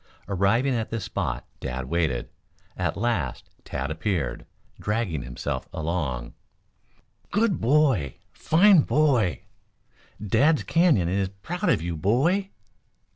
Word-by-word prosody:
Arriving 105 +8 +2
at 115 -2 -2
this 115 -3 -3
spot, 95 -2 -3
Dad 65 0 -4
waited. 70 -4 -1 0.5
At - - -2
last 100 - -2
Tad 70 +3 -4
appeared, 85 +3 -2 0.3
dragging 105 - -1
himself 60 -1 -5
along. 75 -7 -3 1.0
"Good 210 -4 +1
boy! 125 - +2 0.2
Fine 185 +3 +5
boy! 125 - +2 0.8
Dad's 125 - +2
Canyon 165 - +3
is 95 +1 0
proud 130 - -3
of 80 - +2
you, 85 -1 -3
boy!" 140 - +1
100 Hz, 110 wpm, -25 LUFS, -, 1.0 s, Fine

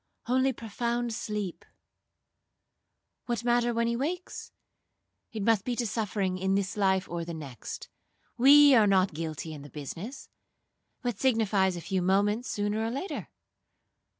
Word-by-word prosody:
only 260 +2 +2
profound 235 +1 -2 2.1
sleep.—What 240 -1 -2
matter 240 0 +2
when 230 0 +1
he 235 0 0
wakes? 340 +8 -4 0.8
It 215 -3 -4
must 220 -2 +3
be 245 - -2
to 240 - -1
suffering 200 -4 -1
in 190 +1 +1
this 200 0 -1
life 190 -2 +2
or 170 0 -4
the 170 0 -6
next. 140 -8 -7 0.5
We 285 +4 +8
are 220 -4 +6
not 190 -2 +3
guilty 160 0 -5
in 150 - -8
the 145 - -11
business. 165 - -7 0.8
What 245 -5 -2
signifies 210 -7 +2
a 175 - -6
few 185 +3 -1
moments 205 +6 +1
sooner 205 +1 -1
or 225 - -1
later?' 280 +11 -4
210 Hz, 140 wpm, -29 LUFS, 190-240 Hz, 2.1 s, We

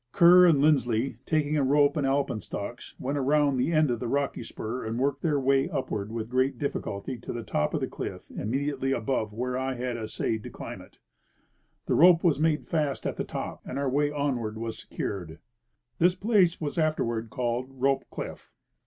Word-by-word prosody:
Kerr 180 +1 +8
and 165 -4 +5
Linds 150 -5 +4
ley, 115 +1 -1
taking 155 -1 +1
a 145 - +2
rope 145 +2 +4
and 145 -3 +1
alpenstocks, 120 -4 -3
went 140 +3 -2
around 140 0 +2
the 130 +6 +1
end 155 -4 +3
of 120 - -1
the 120 - -3
rocky 140 +3 -1
spur 115 +2 -5
and 110 +1 -3
worked 140 +2 0
their 150 -4 +1
way 135 +3 +2
upward 130 - -3
with 115 -1 -4
great 130 +1 +1
difficulty 120 -3 -4
to - - -6
the 120 -1 -5
top 75 -7 -1
of - - -1
the - - 0
cliff - - -7
immediately 135 +3 -1
above 110 -3 -1
where 125 +4 -3
I 130 0 -1
had 125 -1 -3
essayed 110 0 -2
to - - -8
climb - - -8
it. - - -17 0.9
A - - +1
rope 170 0 +6
was 165 -5 +3
made 155 -1 +1
fast 150 -5 -1
at - - -1
the - - -1
top, - - -5
and 130 - -6
our 140 -2 0
way 145 +2 +2
onward 130 -7 -2
was 115 0 -5
secured. 85 -5 -5 0.6
This 175 +2 +4
place 190 -3 +3
was 155 +1 -3
afterward 115 -8 0
called 120 +1 -2
Rope 135 +1 0
cliff. - - -7
135 Hz, 195 wpm, -27 LUFS, 120-150 Hz, 0.9 s, Kerr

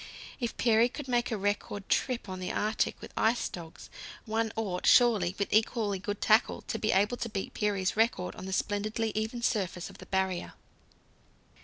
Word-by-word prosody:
If 235 -3 -3
Peary 230 0 +4
could 280 +2 -7
make 240 -1 +1
a 225 - -1
record 205 0 -2
trip 250 -4 0
on 185 -1 -5
the 185 - -3
Arctic 215 +1 0 0.2
ice 225 +2 +3
with - - -3
dogs, 165 -2 -10 0.3
one 225 0 0
ought, 195 -5 -2
surely, 210 -7 +5
with 200 - -2
equally 215 -2 +2
good 205 +1 -4
tackle, 220 +2 +3
to 225 - -4
be 215 - +1
able 205 +5 +2
to 235 - -3
beat 195 -3 -4
Peary's 200 -3 0
record 220 -5 +1
on 185 - -8
the - - -4
splendidly 215 +3 -1
even 220 +2 -3
surface 185 -7 -1
of - - -16
the - - -11
Barrier. 190 -2 -1
215 Hz, 180 wpm, -30 LUFS, 190-225 Hz, 0.3 s, surely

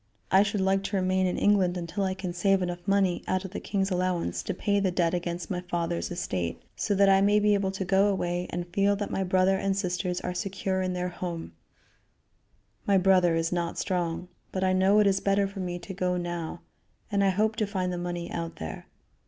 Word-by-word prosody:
"I 190 - +7
should 205 -1 0
like 195 +1 +2
to 200 - -2
remain 185 0 +2
in 180 - -1
England 190 -3 +3
until 175 +3 -3
I 190 0 -1
can 185 -2 -4
save 195 +1 +2
enough 175 +1 -5
money 195 -3 +2
out 185 +1 0
of 190 - -7
the - - -4
king's 195 -1 -1
allowance 180 -1 -1
to 195 - -3
pay 200 +2 +1
the 195 -1 +1
debt 175 -1 +1
against 175 -1 -3
my 180 -1 -2
father's 175 -1 -2
estate, 95 - -3 0.2
so 205 - 0
that 200 0 +5
I 195 0 +5
may 205 +1 +4
be 210 0 +3
able 200 -1 +1
to 190 0 -3
go 195 +2 +4
away 175 -3 -1
and 175 0 -3
feel 200 +1 +3
that 205 0 -4
my 195 - 0
brother 185 +1 +3
and 195 0 0
sisters 180 -1 -1
are 180 - -3
secure 190 0 -2
in 185 0 -1
their 180 0 -2
home 175 - -5 1.4
my 200 -1 +5
brother 185 -2 +4
is 165 +1 0
not 170 -1 -2
strong 180 -2 -2 0.2
but 190 - -2
I 185 0 +3
know 190 +2 +4
it 210 - +5
is 195 -1 +3
better 200 0 +2
for 195 0 -9
me 180 -1 -3
to 175 +3 -8
go 180 -1 0
now, 175 -2 -4 0.5
and 200 -1 +2
I 195 - +4
hope 215 +3 +1
to 215 - 0
find 185 -3 -2
the 175 - -3
money 175 -1 -4
out 165 -1 -4
there. 80 0 -7
185 Hz, 225 wpm, -27 LUFS, 175-195 Hz, 1.4 s, I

